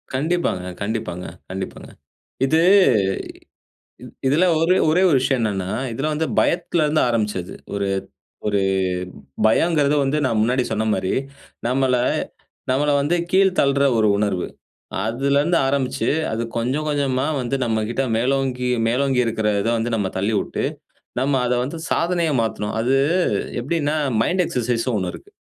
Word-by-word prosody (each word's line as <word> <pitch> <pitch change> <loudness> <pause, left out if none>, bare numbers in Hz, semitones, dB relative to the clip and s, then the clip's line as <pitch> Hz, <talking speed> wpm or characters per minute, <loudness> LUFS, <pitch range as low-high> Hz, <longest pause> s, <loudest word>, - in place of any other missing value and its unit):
கண்டிப்பாங்க, 155 - 0 0.2
கண்டிப்பாங்க, 100 -4 -3 0.2
கண்டிப்பாங்க. 95 +1 -6 0.6
இது 160 +4 +3 1.4
இ - - -8 0.2
இதில 150 +7 +3 0.2
ஒரு 170 +3 +3 0.2
ஒரே 170 +4 +3
ஒரு 150 - +4
விஷயம் 130 0 +1
என்னென்னா, 95 -4 -1 0.2
இதில 135 +7 -2
வந்து 160 +2 -1
பயத்துல 170 -1 +1
இருந்து 155 +1 +2
ஆரம்பிச்சது. 105 -6 -2 0.2
ஒரு 100 -1 -1 0.6
ஒரு 105 -1 +1 0.9
பயங்கிறது 150 +4 +3
வந்து 140 +3 0
நான் 115 -4 0
முன்னாடி 125 +3 +2
சொன்ன 110 +1 0
மாரி, 95 - -1 0.6
நம்மளை 130 -1 +2 0.7
நம்மளை 145 +3 +2
வந்து 150 +5 +1
கீழ் 190 +1 +4
தள்ளிற 140 0 +2
ஒரு 110 -1 +3
உணர்வு, 100 -3 0 0.6
அதுலேருந்து 140 +8 +1
ஆரம்பிச்சு 135 -1 0 0.2
அது 110 +1 -2 0.2
கொஞ்சம் 130 +6 -1
கொஞ்சமா 140 -3 0
வந்து, 125 +2 -1
நம்மகிட்ட 115 +2 -1
மேலோங்கி 125 0 0 0.2
மேலோங்கி 130 +2 +1
இருக்கிற 110 -1 0
இதை 115 - 0
வந்து 115 +1 -1
நம்ம 100 -3 -1
தள்ளிவுட்டு, 105 +2 -1 0.6
நம்ம 135 +2 +1
அதை 125 - +1
வந்து 145 +6 -5
சாதனையை 170 -2 +1
மாத்தணும், 105 -2 -3
அது, 125 +4 +2 0.6
எப்படின்னா 150 +3 -1 0.3
மைண்ட் 180 +7 +1
எக்சர்சைஸ் 120 -3 -1
ன்னு 125 -4 0
ஒண்ணு 90 -2 -2
இருக்கு. - - -13
130 Hz, 135 wpm, -21 LUFS, 110-145 Hz, 1.4 s, ஒரு